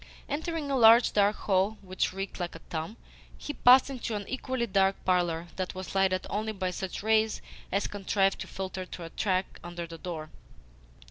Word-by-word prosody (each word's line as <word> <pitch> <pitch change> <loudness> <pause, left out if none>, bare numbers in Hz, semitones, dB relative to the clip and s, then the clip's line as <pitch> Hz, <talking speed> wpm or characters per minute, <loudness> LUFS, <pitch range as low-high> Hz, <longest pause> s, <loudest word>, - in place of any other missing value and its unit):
Entering 305 0 -3
a - - +2
large, 230 -1 +7
dark 205 0 +3
hall 195 +2 +1
which 185 0 -1
reeked 195 +1 -5
like 175 -2 -4
a - - -8
tomb, 165 +7 -4 0.4
he 295 - -5
passed 255 -1 +7
into 250 -5 -4
an 205 -1 -5
equally 260 -1 -2
dark 195 -2 +2
parlour 175 -2 +1
that 185 -1 -3
was 185 0 -6
lighted 190 -1 +2
only 215 +1 -2
by 185 -2 -2
such 190 +1 -5
rays 220 0 +2 0.3
as 200 +1 +1
contrived 195 -1 0
to - - -5
filter 190 -1 -5
through 175 -1 -8
a - - -7
crack 190 -2 -1
under 175 0 -6
the 165 -1 -10
door. 160 -3 -6
195 Hz, 185 wpm, -29 LUFS, 185-220 Hz, 0.4 s, large